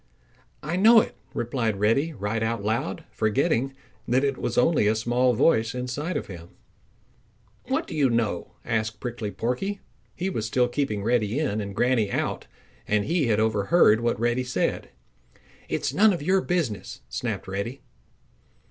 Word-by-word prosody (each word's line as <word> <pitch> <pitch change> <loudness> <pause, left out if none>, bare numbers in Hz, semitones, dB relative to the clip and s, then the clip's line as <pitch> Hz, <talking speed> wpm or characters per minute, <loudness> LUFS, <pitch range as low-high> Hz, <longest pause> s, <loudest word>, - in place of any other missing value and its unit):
"I 160 +4 -2
know 225 +4 +8
it," - - -2 0.2
replied 115 -4 -1
Reddy 115 +10 +2
right 110 -4 -3
out 110 -2 -1
loud, 120 +10 -2
forgetting 135 +4 0 0.3
that 130 +3 +2
it 140 -1 +1
was 120 - -3
only 125 -4 +3
a 110 - +3
small 120 +2 +2
voice 115 -3 +2
inside 130 +7 -3
of - - -4
him. 85 -3 -10 1.2
"What - - 0
do - - -7
you 140 -4 +3
know?" 115 -7 -1
asked 110 -2 -1
Prickly 120 -3 -4
Porky. 125 - -2 0.4
He 180 - -2
was 115 - -2
still 125 +2 +2
keeping 120 -6 -2
Reddy 115 0 +1
in 120 -9 0
and 100 -1 -6
Granny 120 -4 +2
out - - -2 0.4
and 105 -1 +1
he 165 -4 +1
had 110 -2 +2
overheard 110 - +4
what 120 -2 0
Reddy 120 +2 +1
said. 125 0 -1 0.8
"It - - -1
is - - -1
none 210 +1 +5
of 170 - -4
your 190 +4 +3
business!" 165 - -2
snapped 100 - -4
Reddy. 100 +8 -4
120 Hz, 160 wpm, -25 LUFS, 110-140 Hz, 1.2 s, know